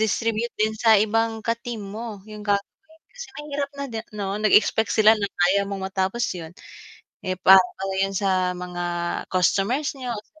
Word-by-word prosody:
distribute 225 +2 0
din 215 +1 +1
sa 220 -1 +5
ibang 225 +2 +1
ka 230 - +2
team 235 -2 -6
mo 210 0 -7
yung 210 0 -9
gagawin 200 -1 +1 0.5
kasi - - -8
mahirap 285 -1 -4
na 280 - -4
'di 225 -1 -4 0.2
no 195 0 -2
nag-expect 215 +1 +3
sila 215 0 +6
na 205 - -2 0.2
kaya 200 +2 +3
mong 195 -1 -4
matapos 190 +4 -1
yun. 165 -2 -7 0.8
Eh, 185 -1 -3
para 190 0 +8 0.2
lang 195 0 -2
yun 195 - -3
sa 185 -2 +1
mga 180 -1 -5 0.5
customers 205 - +1
niyo 250 -2 -4
o 210 - -5
sa 315 +8 -29
210 Hz, 180 wpm, -23 LUFS, 195-230 Hz, 0.8 s, para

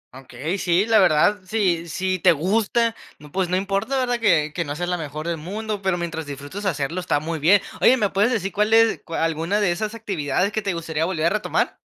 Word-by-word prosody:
Okey, 135 +8 -5
sí, 180 +3 +2
la 225 -2 +4
verdad, 185 +4 +4
si 180 -5 0
si 185 +2 -1
te 175 +1 +5
gusta, 225 - +1 0.2
no, 150 0 -15
pues 185 -1 -1
no 180 - +1
importa, 195 +7 -1
¿verdad? 245 -2 0
Que 165 -9 +2
que 170 - -1
no 145 -1 -5
seas 175 +2 -3
la 180 - 0
mejor 155 +1 -6
del 170 -1 -1
mundo, 205 +5 -5
pero 190 -2 0
mientras 165 -3 -4
disfrutes 145 +9 -7
hacerlo, 160 +1 -2
está 180 - 0
muy 160 +1 -4
bien. 185 +7 +4 0.2
Oye, 260 - +6
¿me 210 -5 0
puedes 210 +6 +2
decir 195 -4 -1
cuál 210 +1 +1
es 225 0 +4
cua 165 -1 -3
alguna 165 +6 -1
de 200 -4 +2
esas 215 +5 -3
actividades 195 -2 -1
que 215 - -2
te 195 -3 -2
gustaría 160 -1 -2
volver 165 -3 -1
a 170 - +5
retomar? 215 0 -1
185 Hz, 225 wpm, -22 LUFS, 160-210 Hz, 0.2 s, Oye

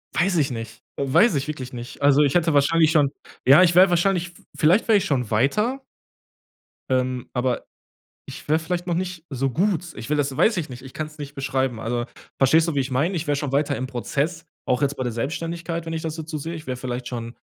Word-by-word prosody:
Weiß 180 +2 +2
ich 140 -4 +1
nicht, 115 -2 -7 0.2
weiß 140 - +4
ich 140 +1 -1
wirklich 130 -4 -6
nicht. 120 +2 -8
Also, 140 0 +5
ich 140 -2 +2
hätte 165 -2 +3
wahrscheinlich 155 +3 +4
schon 150 -4 +4 0.4
ja, 140 +7 +8
ich 175 -1 +4
wäre 185 +2 +7
wahrscheinlich 175 0 +1
v 175 - -20
vielleicht 170 +8 +3
wäre 220 -2 +6
ich - - -3
schon 125 -6 -1
weiter 210 - +1 1.1
ähm, 130 -1 -1
aber 125 0 -1 0.6
ich - - -10
wäre 155 - +4
vielleicht 175 +2 -3
noch 175 - 0
nicht 180 -2 -4
so 135 -1 -1
gut. 175 - 0
Ich 115 - -8
will 150 - +1
das 140 -2 -1
weiß 220 - +3
ich 160 -5 -3
nicht, 125 0 -9
ich 130 -1 -12
kann's 155 0 -6
nicht 145 0 -7
beschreiben. 130 -3 -1
Also 120 +1 -2 0.3
verstehst 160 +5 +4
du, 165 - -1
wie - - +2
ich 135 0 -1
meine? 155 +9 +1
Ich 160 -2 -3
wäre 145 - +2
schon 140 -1 -3
weiter 145 +1 +1
im 130 - -3
Prozess, 145 +6 -2 0.2
auch 125 +2 +1
jetzt 140 0 0
bei 130 - -2
der 125 - -2
Selbstständigkeit, 165 +7 -4
wenn 165 - -4
ich 160 - -3
das 160 0 -4
jetzt 160 +1 -7
so 155 - -2
sehe. 165 +3 -5
Ich 155 - -9
wäre 130 -1 -4
vielleicht 125 0 -5
schon 115 -1 -6
145 Hz, 235 wpm, -23 LUFS, 130-170 Hz, 1.1 s, ja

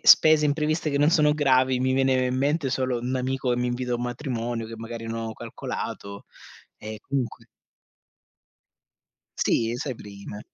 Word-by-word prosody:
spese 155 -1 +7
impreviste 155 +2 +1
che 140 - 0
non 150 +2 +5
sono 150 -2 +4
gravi, 130 -3 +3
mi 130 0 +2
viene 130 -1 +3
in 125 0 -1
mente 140 0 +1
solo 130 -2 0
un 125 +2 -1
amico 130 0 -1
che 120 - 0
mi 125 - 0
invita 125 0 -2
a - - +2
un 120 - -4
matrimonio 120 -2 -3
che 115 - -7
magari 115 0 -6
non 115 0 -3
ho 110 - -4
calcolato 100 -1 -6 0.5
e 110 0 -8
comunque 135 -2 -3 2.0
Sì, 115 +1 +2
sai 130 0 -3
prima. 105 0 -9
130 Hz, 165 wpm, -25 LUFS, 115-140 Hz, 2.0 s, spese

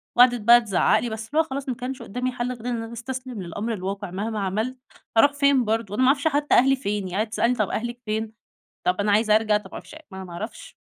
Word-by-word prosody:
وقعدت 245 -2 +5
بقى 240 +2 +7
تزعق 200 -6 +2
لي 240 - -3
بس 220 0 -6
اللي 305 +3 +1
هو - - +5
خلاص 275 -2 -5
ما 245 - -1
كانش 255 +1 -6
قدامي 250 +3 -3
حل 245 0 -3
غير 235 -1 -12
إن 240 - -1
أنا 225 +1 -8
أستسلم 250 -2 -6
للأمر 205 +7 -4
الواقع، 195 -1 -4
مهما 210 +3 -3
عملت 215 +7 -2 0.4
هارُوح 285 +5 +6
فين 280 -3 +3
برضو، 220 -2 -1
أنا 255 - 0
ما 255 - +5
أعرفش 280 +3 +3
حتى 290 0 +2
أهلي 270 +2 +5
فين 205 -6 -3
يعني 185 +2 -4
قعدت 215 - -10
تسألني: 235 +2 +1
"طَب 215 -4 0
أهلِك 240 +2 -3
فين؟"، 220 +1 -2 0.5
طَب 180 +2 +1
أنا 205 0 +2
عايزة 215 0 +4
أرجع 215 -1 +2
طَب 210 - -5
ما - - -33
أعرفش - - -9 0.2
ما 190 - -9
أنا 190 - -6
ما 175 - -11
أعرفش، 210 +7 -8
230 Hz, 255 wpm, -24 LUFS, 210-255 Hz, 0.5 s, بقى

